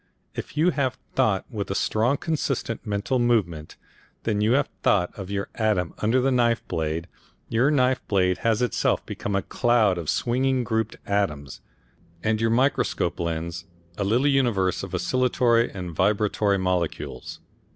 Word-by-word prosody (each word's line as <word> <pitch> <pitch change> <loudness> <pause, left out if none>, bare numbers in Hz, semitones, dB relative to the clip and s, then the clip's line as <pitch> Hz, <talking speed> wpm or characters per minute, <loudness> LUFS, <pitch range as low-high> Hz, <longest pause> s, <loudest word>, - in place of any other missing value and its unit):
If - - -7
you 170 +4 +4
have 135 -5 -1 0.2
thought 110 -8 +1
with 100 -4 -4
a 100 - -2
strong 115 +8 +1
consistent 135 -8 -2
mental 105 +5 0
movement, 95 -11 0 0.5
then 110 -2 0
when - - 0
you 110 +3 +3
have 140 - +2
thought 90 -3 +2
of 95 -2 -7
your 100 -1 -3
atom 105 -6 0
under 115 +4 +2
the 135 +1 +2
knife 120 -2 +1
blade, 80 +1 -2 0.4
your 120 +5 +3
knife 130 -3 +2
blade 90 -2 +2
has 115 +1 +1
itself 120 - 0
become 100 - -4
a 100 - 0
cloud 115 -7 +2
of 80 - -4
swinging 130 +1 +1
grouped 110 -2 -1
atoms, 75 -9 -2 0.6
and 110 0 +1
your 115 - +2
microscope 130 +5 +1
lens 85 +1 -3 0.3
a 100 - -2
little 115 +7 +2
universe 120 -10 +2
of - - -5
oscillatory 125 -2 +2
and 90 -3 -6
vibratory 100 +2 +2
molecules. 90 -3 -3
110 Hz, 155 wpm, -25 LUFS, 95-125 Hz, 0.6 s, you